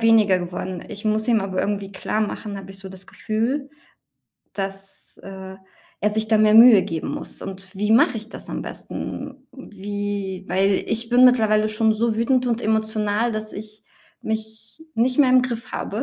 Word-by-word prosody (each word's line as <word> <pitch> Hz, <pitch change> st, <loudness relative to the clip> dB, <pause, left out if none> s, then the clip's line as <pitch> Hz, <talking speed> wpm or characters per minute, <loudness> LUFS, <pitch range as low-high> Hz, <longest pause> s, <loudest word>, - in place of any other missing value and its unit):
weniger 220 Hz, -4 st, +5 dB
geworden. 180 Hz, +1 st, -5 dB
Ich 210 Hz, -1 st, -8 dB
muss 215 Hz, +2 st, 0 dB
ihm 225 Hz, -2 st, +4 dB
aber 190 Hz, -1 st, -2 dB
irgendwie 200 Hz, -1 st, -2 dB
klarmachen, 210 Hz, +1 st, -3 dB
habe 195 Hz, 0 st, -9 dB
ich 195 Hz, -, -9 dB
so 195 Hz, -, -9 dB
das 190 Hz, 0 st, -11 dB
Gefühl, 250 Hz, +6 st, -2 dB, 0.8 s
dass, 195 Hz, 0 st, -5 dB
äh, 190 Hz, 0 st, -9 dB, 0.4 s
er 210 Hz, -, +2 dB
sich 220 Hz, +1 st, 0 dB
da 220 Hz, -, +4 dB
mehr 215 Hz, 0 st, +4 dB
Mühe 225 Hz, -3 st, +9 dB
geben 160 Hz, -1 st, -4 dB
muss. -, -, -4 dB
Und 190 Hz, -1 st, -7 dB
wie 210 Hz, +2 st, -1 dB
mache 230 Hz, +1 st, +4 dB
ich 220 Hz, +1 st, -6 dB
das -, -, -8 dB
am -, -, -3 dB
besten? 270 Hz, -1 st, -6 dB
Wie 205 Hz, -4 st, -5 dB
weil 195 Hz, +1 st, +2 dB
ich 230 Hz, +1 st, +1 dB
bin 245 Hz, +1 st, +5 dB
mittlerweile 215 Hz, -4 st, +4 dB
schon 220 Hz, 0 st, +2 dB
so 220 Hz, 0 st, 0 dB
wütend 250 Hz, +2 st, +2 dB
und 235 Hz, -1 st, 0 dB
emotional, 220 Hz, 0 st, 0 dB
dass 215 Hz, 0 st, -3 dB
ich 215 Hz, 0 st, -7 dB, 0.4 s
mich 220 Hz, +5 st, -5 dB
nicht 250 Hz, +4 st, +1 dB
mehr 265 Hz, -3 st, +5 dB
im 255 Hz, 0 st, +6 dB
Griff 235 Hz, -2 st, -4 dB
habe. 215 Hz, +5 st, -3 dB
215 Hz, 175 wpm, -22 LUFS, 195-230 Hz, 0.8 s, Mühe